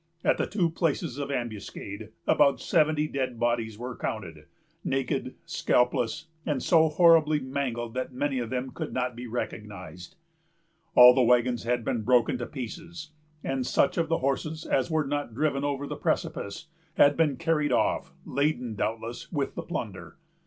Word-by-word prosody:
At - - +2
the - - +1
two 180 -6 0
places 160 -4 -1
of 140 -1 -3
ambuscade, 110 -4 -5 0.2
about 140 -2 +4
seventy 155 -1 +2
dead 130 -5 -3
bodies 115 -2 0
were 125 +1 -6
counted, 85 -8 -5 0.4
naked, 135 -1 -2
scalpless, 125 +4 +1 0.2
and 145 -5 -1
so 160 -2 +5
horribly 155 -2 +5
mangled 130 -4 -3
that 130 +1 -3
many 135 +1 -1
of 120 -2 -3
them 130 +1 -3
could - - -5
not 125 -1 -1
be 120 +1 -7
recognized. 105 - -6 0.8
All 125 0 +10
the 130 - +3
wagons 120 0 +3
had 120 -1 0
been 115 - 0
broken 125 +1 +3
to 120 - -4
pieces, 155 +5 -7 0.3
and 135 -1 -1
such 135 - +2
of 165 -1 0
the 165 - +2
horses 155 +4 -2
as 130 - +1
were 160 -2 +1
not 145 -5 -3
driven 140 0 0
over 145 -1 -1
the - - -5
precipice 100 +11 -2 0.3
had 145 0 +6
been 150 -5 +2
carried 160 -3 +1
off, - - +1
laden, 140 -4 0
doubtless, 115 +3 -4
with 145 -5 -1
the - - -4
plunder. - - -6
130 Hz, 160 wpm, -27 LUFS, 120-150 Hz, 0.8 s, All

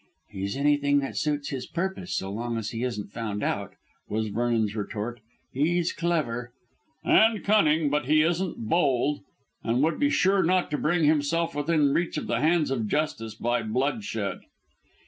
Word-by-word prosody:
"He's 100 +3 -4
anything 145 0 +3
that 135 - -5
suits 145 -2 -1
his 130 -3 -5
purpose, 190 +1 -3
so 95 - -3
long 115 +2 -3
as 110 -2 -3
he 115 - -4
isn't 105 -5 -3
found 105 -3 -4
out," - - -2 0.3
was 110 0 -1
Vernon's 115 -1 0
retort. 110 +3 -4 0.3
"He's 170 +5 +1
clever 135 -9 -1 0.3
" 315 - -43
"And 220 -1 +4
cunning, 160 -8 +3
but 150 -3 0
he 155 +1 +5
isn't 170 - -1
bold, 145 -1 +2 0.4
and 120 +4 +1
would 160 +2 +1
be 285 0 +3
sure 195 -8 +3
not 180 0 +1
to 150 - 0
bring 165 +2 +1
himself 155 +2 +2
within 145 -1 +2
reach 175 0 0
of - - -3
the 115 - 0
hands 160 -2 +2
of 115 -5 -1
justice 115 -6 -2
by 120 +2 0
bloodshed." 110 -3 -2
145 Hz, 165 wpm, -26 LUFS, 115-165 Hz, 0.4 s, he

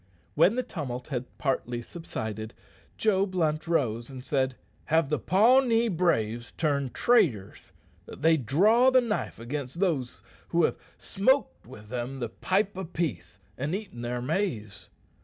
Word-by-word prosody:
When 200 - +4
the 255 - 0
tumult 135 - -6
had 130 -3 -3
partly 120 -3 -2
subsided, 110 -8 -6 0.4
Joe 200 -2 +2
Blunt 160 -4 -1
rose 120 -8 0
and 130 -1 -9
said, 130 -2 0 0.3
"Have 160 -3 +2
the 150 - +1
Pawnee 230 +4 +4
braves 120 - 0
turned 140 -5 -1
traitors 135 - +1 0.4
that - - -11
they 165 0 +6
draw 200 - +4
the 260 0 +5
knife 230 -4 -2
against 135 +5 -5
those 155 -10 -1 0.2
who 170 0 +2
have - - +1 0.2
smoked 260 - 0
with 105 -4 -12
them 125 +2 -4
the 120 -3 -3
pipe 195 - 0
of 180 -2 -7
peace 100 - -3 0.2
and 145 +7 -1
eaten 195 - -7
their 120 0 -3
maize? 125 - -3
150 Hz, 145 wpm, -27 LUFS, 120-190 Hz, 0.4 s, they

